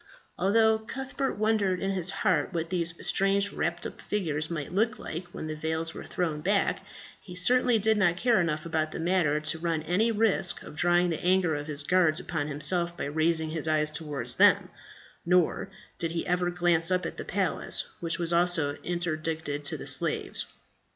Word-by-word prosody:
Although 220 Hz, +3 st, +3 dB
Cuthbert 265 Hz, +4 st, -4 dB
wondered 210 Hz, -4 st, +1 dB
in 195 Hz, +1 st, -1 dB
his 185 Hz, -2 st, +1 dB
heart 185 Hz, -5 st, 0 dB
what 165 Hz, 0 st, -3 dB
these 170 Hz, -2 st, +2 dB
strange 200 Hz, +1 st, +1 dB
wrapped 170 Hz, +1 st, -2 dB
up -, -, -7 dB
figures 160 Hz, -7 st, -2 dB
might 155 Hz, -4 st, -4 dB
look 215 Hz, +3 st, +1 dB
like 170 Hz, -1 st, -6 dB
when 175 Hz, -2 st, -8 dB
the 155 Hz, -, -4 dB
veils 160 Hz, +1 st, -2 dB
were -, -, -8 dB
thrown 160 Hz, -4 st, -2 dB
back, 200 Hz, +4 st, 0 dB, 0.4 s
he 180 Hz, -, -11 dB
certainly 245 Hz, +5 st, +4 dB
did 220 Hz, +1 st, +2 dB
not 175 Hz, -4 st, +2 dB
care 235 Hz, -2 st, +3 dB
enough 155 Hz, -2 st, -2 dB
about 155 Hz, -1 st, -1 dB
the -, -, -5 dB
matter 165 Hz, -3 st, +1 dB
to 155 Hz, +2 st, -1 dB
run 165 Hz, -2 st, -1 dB
any 195 Hz, +8 st, +1 dB
risk 215 Hz, -4 st, +1 dB
of -, -, -11 dB
drawing 175 Hz, +2 st, +2 dB
the 160 Hz, -, -4 dB
anger 180 Hz, -2 st, +2 dB
of 145 Hz, 0 st, -4 dB
his 145 Hz, -2 st, +1 dB
guards 170 Hz, -1 st, +3 dB
upon 160 Hz, -5 st, -3 dB
himself 170 Hz, +4 st, 0 dB
by -, -, -3 dB
raising 160 Hz, +2 st, 0 dB
his 160 Hz, -1 st, -2 dB
eyes 155 Hz, -1 st, +1 dB
towards 150 Hz, -5 st, -4 dB
them; -, -, +5 dB, 0.5 s
nor 180 Hz, -1 st, +1 dB, 0.3 s
did 165 Hz, -, -1 dB
he 170 Hz, -, -2 dB
ever 180 Hz, 0 st, 0 dB
glance 175 Hz, -1 st, +1 dB
up 185 Hz, -1 st, +1 dB
at -, -, -5 dB
the -, -, -5 dB
palace, 195 Hz, -2 st, 0 dB
which 165 Hz, -1 st, -2 dB
was 170 Hz, 0 st, 0 dB
also 170 Hz, -4 st, +2 dB
interdicted 160 Hz, -4 st, -3 dB
to 145 Hz, -, -1 dB
the -, -, -8 dB
slaves. -, -, +1 dB
175 Hz, 185 wpm, -28 LUFS, 155-190 Hz, 0.5 s, them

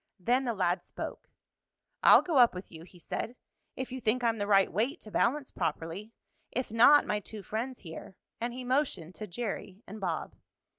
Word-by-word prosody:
Then 250 Hz, +8 st, +2 dB
the 235 Hz, -2 st, -1 dB
lad 180 Hz, -2 st, +1 dB
spoke. -, -, -7 dB, 0.7 s
"I'll -, -, +8 dB
go 320 Hz, -7 st, +2 dB
up 240 Hz, -5 st, +6 dB
with 180 Hz, -, -8 dB
you," 160 Hz, -, -10 dB
he 180 Hz, -, -17 dB
said, 225 Hz, +7 st, -4 dB, 0.4 s
"if 260 Hz, -1 st, -5 dB
you 260 Hz, 0 st, -5 dB
think 240 Hz, +3 st, +1 dB
I'm 230 Hz, -2 st, +1 dB
the 205 Hz, -, -1 dB
right 195 Hz, -2 st, +4 dB
weight 245 Hz, -, 0 dB
to 215 Hz, -, -11 dB
balance 270 Hz, +6 st, +1 dB
properly. 165 Hz, +5 st, -3 dB, 0.4 s
If 255 Hz, -2 st, -3 dB
not 245 Hz, +6 st, +7 dB
my 210 Hz, -, 0 dB
two 210 Hz, 0 st, -9 dB
friends 235 Hz, +5 st, -4 dB
here 165 Hz, +1 st, -9 dB
" -, -, -45 dB
and 240 Hz, +1 st, -1 dB
he 255 Hz, +1 st, -6 dB
motioned 250 Hz, -, 0 dB
to 215 Hz, +2 st, -7 dB
Jerry 200 Hz, 0 st, -5 dB
and 210 Hz, +2 st, -9 dB
Bob. 170 Hz, -4 st, -2 dB
220 Hz, 195 wpm, -30 LUFS, 185-250 Hz, 0.7 s, I'll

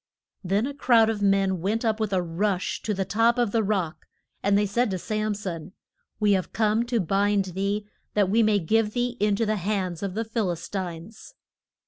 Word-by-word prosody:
Then 195 Hz, +5 st, +1 dB
a 285 Hz, -, -4 dB
crowd 235 Hz, -6 st, +4 dB
of 210 Hz, -2 st, -4 dB
men 195 Hz, -2 st, +2 dB
went 220 Hz, +6 st, -1 dB
up 220 Hz, -1 st, +1 dB
with 215 Hz, -2 st, -1 dB
a 185 Hz, -2 st, +1 dB
rush 185 Hz, +3 st, -1 dB
to 215 Hz, -, -1 dB
the 190 Hz, 0 st, -1 dB
top 230 Hz, +5 st, +2 dB
of 240 Hz, -4 st, +1 dB
the 225 Hz, -, +2 dB
rock, 190 Hz, -6 st, -2 dB, 0.3 s
and 200 Hz, 0 st, +3 dB
they 205 Hz, -, +2 dB
said 235 Hz, +4 st, +1 dB
to 190 Hz, -, -2 dB
Sam 215 Hz, +2 st, -2 dB
son, 185 Hz, -3 st, -6 dB, 0.5 s
We 210 Hz, -1 st, +3 dB
have 190 Hz, -2 st, 0 dB
come 220 Hz, +1 st, +2 dB
to 240 Hz, -1 st, +1 dB
bind 200 Hz, +2 st, +1 dB
thee, 200 Hz, +2 st, -1 dB, 0.3 s
that 205 Hz, -2 st, +3 dB
we 220 Hz, +5 st, +3 dB
may 215 Hz, -2 st, +3 dB
give 210 Hz, +4 st, +1 dB
thee 245 Hz, 0 st, -1 dB
in 210 Hz, 0 st, +2 dB
to 225 Hz, -, 0 dB
the 215 Hz, 0 st, 0 dB
hands 185 Hz, -3 st, -2 dB
of 195 Hz, -2 st, -3 dB
the 225 Hz, +1 st, -1 dB
Phil 225 Hz, -3 st, -1 dB
is 170 Hz, -1 st, -4 dB
tines. 190 Hz, -, -7 dB
205 Hz, 210 wpm, -25 LUFS, 190-220 Hz, 0.5 s, crowd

